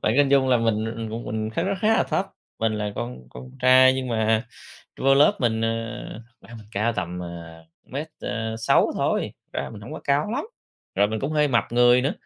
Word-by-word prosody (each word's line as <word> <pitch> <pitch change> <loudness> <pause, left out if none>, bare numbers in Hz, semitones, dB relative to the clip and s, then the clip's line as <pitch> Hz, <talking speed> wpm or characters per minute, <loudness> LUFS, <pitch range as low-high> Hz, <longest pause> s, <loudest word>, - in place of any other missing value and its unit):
Bạn 110 - +2
cứ - - +2
hình 145 -1 +5
dung 135 -1 +4
là 125 - +5
mình 115 -2 +1
người 115 0 -4
của 110 - -4
mình 110 0 -2
nó 110 - -3
khá - - 0
nó 195 +2 0
khá 215 - +2
là - - +3
thấp, 195 - -1 0.3
mình 110 0 +1
là 105 -1 -3
con 120 - -6
con 130 - -10
trai, 130 0 +7
nhưng 130 -1 -3
mà 110 0 +1 0.6
vô 135 +1 +4
lớp 145 +2 +5
mình, 115 -2 +1
à, 115 +1 -6
mình 110 -2 -13
cao 110 +4 0
tầm, 90 -4 -4
à, 85 -1 -9 0.2
mét, 145 +4 -5
ờ, 110 0 -3
sáu 115 - +3
thôi, - - 0
thực - - -49
ra - - -4
mình 105 - -10
hổng 115 +8 -9
có - - -7
cao 145 +7 +1
lắm, 260 +6 -2 0.5
rồi 100 +2 +3
mình 110 0 -3
cũng 140 +3 -2
hơi 150 -1 +2
mập 120 -4 +2
người 120 +1 +5
nữa, 140 +5 0
115 Hz, 235 wpm, -24 LUFS, 110-130 Hz, 0.6 s, trai